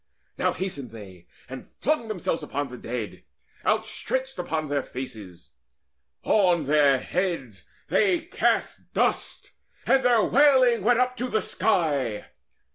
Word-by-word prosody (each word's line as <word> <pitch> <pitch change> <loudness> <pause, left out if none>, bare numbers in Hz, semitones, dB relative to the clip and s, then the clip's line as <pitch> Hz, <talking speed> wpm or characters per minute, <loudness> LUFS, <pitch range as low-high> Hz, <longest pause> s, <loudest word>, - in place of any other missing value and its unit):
Now - - +1
hasted 145 -9 -5
they 95 -6 -12 0.2
And 130 0 -9
flung 290 -5 0
themselves 185 -5 -2
upon 145 0 -3
the 125 - -9
dead, 115 -2 -5 0.4
outstretched 265 -3 -1
Upon 160 -3 -2
their 145 0 0
faces: 105 -10 -9 0.7
on 180 -7 +3
their 145 -1 +4
heads 165 - -3 0.2
they 365 -5 +2
cast 325 - -1
Dust, - - -1 0.3
and 270 - +4
their 240 -3 +4
wailing 260 -4 +4
went 240 +2 +4
up 250 0 +1
to 250 - -2
the 220 - 0
sky. 145 - 0
170 Hz, 125 wpm, -25 LUFS, -, 0.7 s, their